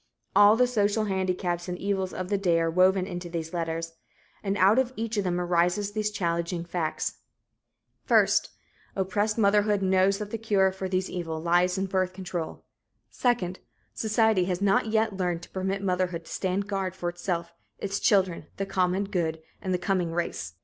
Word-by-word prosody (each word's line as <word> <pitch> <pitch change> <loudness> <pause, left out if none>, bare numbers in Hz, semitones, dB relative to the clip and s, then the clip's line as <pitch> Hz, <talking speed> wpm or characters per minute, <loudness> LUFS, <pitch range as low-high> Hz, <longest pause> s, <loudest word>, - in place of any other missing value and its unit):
All 205 +1 +7
the 250 +2 +4
social 215 -2 +1
handicaps 185 -3 -1
and 180 - -3
evils 190 -1 -1
of 185 0 -5
the 205 - +2
day 175 -4 +2
are 165 0 +1
woven 185 +2 +4
into 175 -2 -6
these 165 -1 -5
letters 165 -1 -3 0.5
and 200 0 -1
out 200 +6 +5
of 260 -1 +1
each 225 0 -3
of 205 - +1
them 180 -1 0
rises 180 +3 +1
these 215 0 -1
challenging 170 -3 -2
facts: 170 -2 -3 0.8
First, - - +3 0.5
oppressed 205 +3 0
motherhood 205 -1 +3
knows 190 +1 +3
that 210 0 -6
the 230 - -3
cure 200 -4 +2
for 190 0 -5
these 185 0 0
evils 160 -3 -4
lies 180 +2 +3
in 190 - 0
birth 185 -1 0
control; 180 -3 -5 0.5
second, 195 -8 0 0.3
society 220 -3 +2
has 180 -1 -1
not 200 +2 +2
yet 220 -1 +1
learned 175 -2 -1
to - - -12
permit 190 +1 -2
motherhood 180 -3 -1
to - - -12
stand 190 +1 -1
guard 195 -2 -2
for 175 - -4
itself, 175 -1 -3 0.2
its 200 0 -3
children, 190 -4 +2
the 195 - -1
common 185 0 +1
good 170 -5 -2 0.2
and 185 - -3
the 180 - +2
coming 180 -2 0
race. 165 - -3
185 Hz, 175 wpm, -27 LUFS, 175-200 Hz, 0.8 s, All